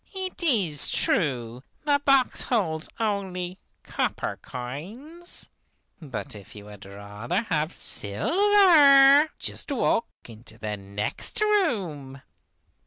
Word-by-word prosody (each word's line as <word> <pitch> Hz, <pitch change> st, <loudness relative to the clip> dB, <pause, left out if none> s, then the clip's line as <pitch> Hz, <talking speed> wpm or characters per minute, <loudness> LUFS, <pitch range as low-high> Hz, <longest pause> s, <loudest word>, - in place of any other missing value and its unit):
It 375 Hz, -1 st, -5 dB
is 195 Hz, -, +3 dB
true 125 Hz, -, 0 dB, 0.2 s
the 285 Hz, -1 st, +2 dB
box 275 Hz, -3 st, +3 dB
holds 165 Hz, -9 st, -1 dB
only 190 Hz, -4 st, -3 dB, 0.2 s
copper -, -, -3 dB
coins, 215 Hz, -, -8 dB, 0.5 s
but 140 Hz, -2 st, -6 dB
if 105 Hz, -1 st, -12 dB
you 105 Hz, -1 st, -11 dB
would 105 Hz, -1 st, -12 dB
rather 105 Hz, -, -4 dB
have 155 Hz, -6 st, -1 dB
silver, 295 Hz, -, +5 dB
just -, -, -4 dB
walk 240 Hz, -3 st, +1 dB, 0.2 s
into 115 Hz, -1 st, -12 dB
the 105 Hz, -1 st, -4 dB
next 100 Hz, -, -4 dB
room. 195 Hz, -, -1 dB
180 Hz, 105 wpm, -25 LUFS, -, 0.5 s, silver